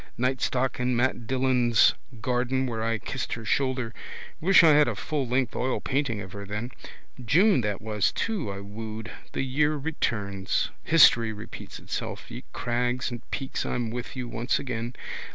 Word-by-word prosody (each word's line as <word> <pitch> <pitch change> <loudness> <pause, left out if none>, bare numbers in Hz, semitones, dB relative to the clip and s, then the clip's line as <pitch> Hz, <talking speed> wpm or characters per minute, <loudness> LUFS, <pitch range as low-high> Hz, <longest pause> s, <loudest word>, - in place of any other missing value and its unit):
Nightstock 130 0 0
in 125 0 +1
Mat 120 -1 0
Dillon's 125 -3 +4 0.3
garden 125 +2 +1
where 115 -3 -3
I 115 0 +1
kissed 130 +3 -4
her 115 -1 -6
shoulder. 130 0 0 0.5
Wish 180 +1 +6
I 165 - +8
had 150 0 +6
a - - -1
full 145 -4 -2
length 125 -1 +1
oilpainting 130 -3 -1
of 95 - -10
her 100 +1 -7
then. 105 +5 -4 0.5
June 175 - +4
that 105 -2 -2
was 105 -3 +1
too 205 - -2
I 100 0 -6
wooed. 110 +2 -7 0.2
The - - -1
year 145 +3 +2
returns. 105 -10 -1
History 120 -8 +6
repeats 105 +1 -8
itself. - - -5
Ye - - -7
crags 125 +2 -1
and 120 -1 -5
peaks 135 - -3
I'm 120 -2 -2
with 120 +3 -5
you 125 -2 -4
once 120 +2 0
again. 120 -2 -4
125 Hz, 160 wpm, -27 LUFS, 110-130 Hz, 0.5 s, I